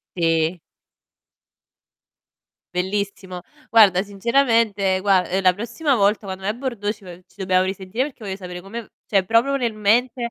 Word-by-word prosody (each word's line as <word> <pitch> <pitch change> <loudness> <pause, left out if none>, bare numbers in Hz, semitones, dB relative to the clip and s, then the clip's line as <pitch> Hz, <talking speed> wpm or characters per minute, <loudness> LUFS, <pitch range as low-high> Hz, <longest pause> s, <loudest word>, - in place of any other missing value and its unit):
Sì. 165 0 +1 2.2
Bellissimo. 190 0 -3 0.3
Guarda, 200 -5 +6
sinceramente 210 -2 +1
gua 190 -2 +3
ehm, 190 +2 -1
la 185 - +5
prossima 235 - -1
volta 205 -1 +2
quando 190 0 -6
vai 200 - -1
a - - -11
bordo 235 -5 -3
ci 210 - -18
vo 180 - -9
ci - - -28
dobbiamo 185 -2 +1
risentire 190 +5 -2
perché 260 -6 -9
voglio 190 -1 -4
sapere 180 -2 -8
come 225 +5 -7
v 215 - -19 0.2
cioè 195 -3 +2
proprio 235 +6 +3
nel 235 -4 -1
mente 235 +3 +1
200 Hz, 155 wpm, -21 LUFS, 185-230 Hz, 2.2 s, Guarda